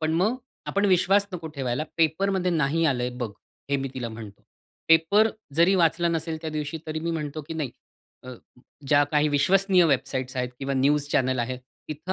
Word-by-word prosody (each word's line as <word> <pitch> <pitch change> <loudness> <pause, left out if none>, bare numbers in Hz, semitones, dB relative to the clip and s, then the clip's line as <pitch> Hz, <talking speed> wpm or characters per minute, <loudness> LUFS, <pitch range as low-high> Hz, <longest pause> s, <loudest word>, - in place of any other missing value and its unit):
पण 155 0 0
मग 205 +9 +2 0.3
आपण 200 +1 0
विश्वास 195 +2 +3
नको 165 -2 -5
ठेवायला, 130 +2 -1
पेपरमध्ये 180 +3 +1
नाही 160 0 +1
आलंय 125 -3 0
बघ." 115 -4 -2 0.4
हे 140 - +3
मी 135 0 -3
तिला 120 -3 -4
म्हणतो. 110 -3 -10 0.5
पेपर 165 +7 +5 0.2
जरी 170 +5 +4
वाचला 170 -1 +2
नसेल 165 -1 -2
त्या 160 -1 -4
दिवशी 150 +1 -4
तरी 155 0 -3
मी 170 +1 -2
म्हणतो 155 -2 -4
की 165 - -5
नाही 150 -6 -3 0.5
अ, 130 - -8 0.6
ज्या 145 +1 +5
काही 150 0 +3
विश्वसनीय 185 +5 +3
वेबसाइट्स 130 -2 -1
आहेत 125 -1 -1
किंवा 135 0 -2
न्यूज 140 +2 +2
चॅनल 130 0 +1
आहेत 125 +1 -2 0.3
तिथं 155 +5 -4
155 Hz, 180 wpm, -25 LUFS, 135-170 Hz, 0.6 s, पेपर